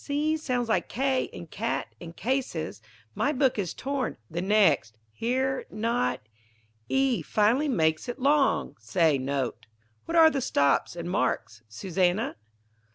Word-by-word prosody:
C 300 Hz, +2 st, 0 dB
sounds 250 Hz, -6 st, -1 dB
like 220 Hz, -, 0 dB
K 265 Hz, +1 st, +1 dB
in -, -, -9 dB
cat 220 Hz, +8 st, -3 dB
and 170 Hz, -1 st, -9 dB
cases. 235 Hz, -, -2 dB, 0.3 s
My 285 Hz, -, +1 dB
book 265 Hz, -5 st, +1 dB
is 180 Hz, -4 st, -3 dB
torn. 275 Hz, -1 st, -3 dB
The 170 Hz, +2 st, -2 dB
next 185 Hz, -, +3 dB
Here 260 Hz, -, -1 dB
not 230 Hz, +3 st, -1 dB, 0.7 s
E 270 Hz, -3 st, +2 dB
final 230 Hz, +8 st, +2 dB
makes 160 Hz, -, +1 dB
it 245 Hz, -, -4 dB
long 280 Hz, +1 st, +2 dB
say 140 Hz, +7 st, +2 dB
note. 130 Hz, -4 st, -3 dB, 0.4 s
What 335 Hz, +1 st, -1 dB
are 320 Hz, -1 st, +8 dB
the 275 Hz, -, -1 dB
stops 140 Hz, -, +1 dB
and 170 Hz, 0 st, -5 dB
marks, 115 Hz, -, -1 dB
Susannah? 180 Hz, -, 0 dB
225 Hz, 140 wpm, -27 LUFS, 165-265 Hz, 0.7 s, are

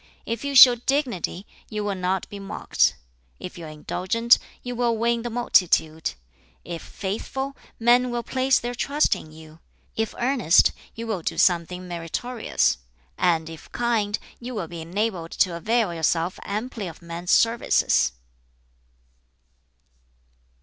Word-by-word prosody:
If 230 Hz, +2 st, -3 dB
you 280 Hz, 0 st, -3 dB
show 255 Hz, -1 st, +11 dB
dignity 240 Hz, -, -2 dB, 0.2 s
you 210 Hz, -1 st, -3 dB
will 205 Hz, -1 st, -1 dB
not 185 Hz, 0 st, -1 dB
be 205 Hz, -, -9 dB
mocked; 200 Hz, +2 st, +1 dB, 0.4 s
if 180 Hz, -, -8 dB
you 170 Hz, -, -8 dB
are -, -, -8 dB
indulgent 190 Hz, +9 st, +2 dB, 0.2 s
you 245 Hz, 0 st, -5 dB
will 235 Hz, -1 st, +1 dB
win 235 Hz, +1 st, +1 dB
the 240 Hz, -, -4 dB
multitude; 170 Hz, -, +2 dB, 0.5 s
if 170 Hz, -1 st, -6 dB
faithful, 265 Hz, +8 st, -4 dB, 0.2 s
men 245 Hz, +2 st, +4 dB
will 240 Hz, -1 st, -2 dB
place 265 Hz, +1 st, +2 dB
their 240 Hz, 0 st, -4 dB
trust 285 Hz, +5 st, +1 dB
in 155 Hz, -, -10 dB
you; 155 Hz, 0 st, -14 dB, 0.4 s
if 220 Hz, -1 st, -2 dB
earnest, 240 Hz, -, +4 dB, 0.2 s
you 230 Hz, -, -5 dB
will 215 Hz, -6 st, -2 dB
do -, -, -3 dB
something 180 Hz, +1 st, +2 dB
meritorious; 175 Hz, -, -1 dB, 0.4 s
and 160 Hz, -, +1 dB
if 165 Hz, -1 st, -11 dB
kind, 225 Hz, -4 st, 0 dB, 0.2 s
you 245 Hz, +1 st, -7 dB
will 190 Hz, -6 st, -3 dB
be 170 Hz, 0 st, -7 dB
enabled 180 Hz, 0 st, -2 dB
to 180 Hz, -3 st, +2 dB
avail 215 Hz, +2 st, +1 dB
yourself 165 Hz, +2 st, 0 dB
amply 215 Hz, 0 st, -4 dB
of 165 Hz, 0 st, -11 dB
men's 170 Hz, +1 st, -7 dB
services." 230 Hz, -, +3 dB
205 Hz, 140 wpm, -24 LUFS, 170-240 Hz, 0.5 s, show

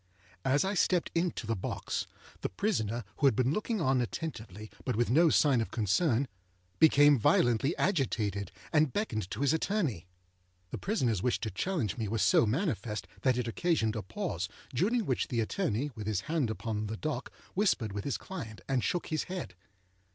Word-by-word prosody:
As 140 Hz, +6 st, +3 dB
I 195 Hz, -, 0 dB
stepped 180 Hz, -2 st, +2 dB
into 170 Hz, -7 st, -1 dB
the 115 Hz, +1 st, 0 dB
box, 90 Hz, -, -3 dB, 0.3 s
the -, -, -1 dB
prisoner, 115 Hz, -, -1 dB
who 145 Hz, -, +4 dB
had 130 Hz, -, +3 dB
been 130 Hz, +4 st, +2 dB
looking 215 Hz, +2 st, -1 dB
on 135 Hz, -5 st, +2 dB
attentively, 110 Hz, -, -5 dB
but 125 Hz, -, -1 dB
with 120 Hz, +1 st, +1 dB
no 165 Hz, +5 st, +6 dB
sign 140 Hz, -6 st, +4 dB
of 110 Hz, -, -3 dB
concern, 120 Hz, -, +1 dB, 0.5 s
became 145 Hz, -3 st, +6 dB
violently 120 Hz, +6 st, +3 dB
agitated, 105 Hz, -, 0 dB, 0.2 s
and 155 Hz, -3 st, +4 dB
beckoned 110 Hz, -, -2 dB
to 110 Hz, -, -5 dB
his 140 Hz, +1 st, +3 dB
attorney. 160 Hz, -, -1 dB, 0.6 s
The -, -, -4 dB
prisonerâs 125 Hz, -, 0 dB
wish 125 Hz, -, +1 dB
to 110 Hz, -, -2 dB
challenge 125 Hz, -, -1 dB
me 110 Hz, -3 st, -2 dB
was 105 Hz, -1 st, 0 dB
so 100 Hz, +4 st, +5 dB
manifest, 110 Hz, -, -1 dB
that 130 Hz, -2 st, +2 dB
it 125 Hz, -2 st, -1 dB
occasioned 115 Hz, -4 st, +1 dB
a 110 Hz, -, -2 dB
pause, 100 Hz, -, -3 dB, 0.2 s
during 220 Hz, -, +1 dB
which 130 Hz, -, 0 dB
the 120 Hz, -, -1 dB
attorney, 130 Hz, -, -1 dB
with 110 Hz, -3 st, -7 dB
his 105 Hz, -4 st, 0 dB
hand 150 Hz, -5 st, 0 dB
upon 110 Hz, -1 st, -3 dB
the 110 Hz, +1 st, -4 dB
dock, 150 Hz, -2 st, -3 dB, 0.2 s
whispered 180 Hz, -, +1 dB
with 100 Hz, 0 st, -4 dB
his 140 Hz, -, -1 dB
client, 115 Hz, -, -7 dB
and 130 Hz, -3 st, +1 dB
shook 175 Hz, -, -1 dB
his 155 Hz, -, -1 dB
head. 180 Hz, -, -5 dB
125 Hz, 180 wpm, -31 LUFS, 110-160 Hz, 0.6 s, no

